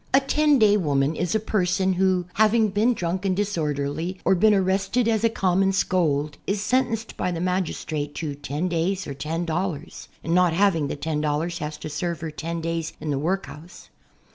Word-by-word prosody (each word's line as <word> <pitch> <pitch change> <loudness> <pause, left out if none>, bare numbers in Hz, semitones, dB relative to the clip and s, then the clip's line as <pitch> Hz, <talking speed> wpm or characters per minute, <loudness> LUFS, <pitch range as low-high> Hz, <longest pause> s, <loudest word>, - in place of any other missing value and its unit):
A - - +8
ten 295 +1 +3
day 210 -3 +5
woman 145 -4 +1
is 175 +4 -1
a - - +3
person 190 -3 +1
who, 185 -1 +2
having 220 0 +3
been 215 +5 +2
drunk 180 0 -2
and 190 -2 +1
dis 205 0 -1
orderly 150 +3 -2
or - - +5
been 215 +4 +4
arrested 195 +4 +1
as 220 -1 +1
a 230 - +5
common 195 -2 +2
scold, 155 -6 0
is 200 +1 0
sentenced 230 0 0
by - - -1
the 170 - -3
magistrate 165 -5 -2
to 155 -3 -3
"ten 145 +4 -3
days 180 +3 -1
or 140 - -5
ten 155 +5 -3
dollars," 170 -1 -4 0.2
and 165 - -1
not 180 -2 +4
having 170 -5 +2
the - - -3
ten 150 +1 -2
dollars 155 +3 -1
has 150 0 -5
to - - -7
serve 165 +2 -3
her 160 -1 -4
ten 165 +3 -4
days 165 -1 -3
in 155 - -3
the 140 - 0
workhouse. 175 0 -4
180 Hz, 195 wpm, -24 LUFS, 155-195 Hz, 0.2 s, A